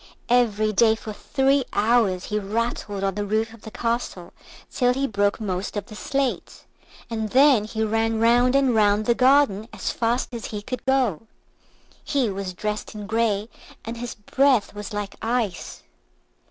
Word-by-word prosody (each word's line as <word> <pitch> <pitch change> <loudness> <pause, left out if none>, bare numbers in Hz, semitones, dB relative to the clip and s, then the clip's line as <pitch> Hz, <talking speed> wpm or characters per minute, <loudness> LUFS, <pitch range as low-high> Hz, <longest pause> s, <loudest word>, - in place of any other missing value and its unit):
Every 215 -3 +2
day 220 +2 +4
for 220 -1 -8
three 270 +5 +1
hours 210 -4 +2
he 210 0 -2
rattled 210 -1 -3
on 195 0 0
the 205 +2 -3
roof 220 +2 -1
of 230 - -15
the 220 - -9
castle 230 -6 -3 0.4
till 250 -1 +2
he 275 +1 0
broke 205 -3 0
most 195 -1 -3
of 205 - -3
the 215 - -13
slates, 270 +3 -2 0.4
and 220 -2 -3
then 265 -3 +5
he 220 0 -2
ran 225 +1 0
round 245 +3 +4
and 270 -3 +3
round 210 -1 +3
the 235 - +4
garden 255 -5 +3
as - - -3
fast 240 +2 -1
as 230 -2 -5
he 210 -1 -6
could 255 +3 -5
go. 250 - +1 0.8
He 260 -7 0
was 190 -1 -5
dressed 210 +2 -4
in 210 -1 -6
grey, 215 -1 0 0.4
and 230 +1 -5
his 240 -1 -6
breath 255 +2 +2
was 205 -1 -7
like 205 -1 -5
ice. 225 -5 -2
220 Hz, 165 wpm, -23 LUFS, 205-245 Hz, 0.8 s, then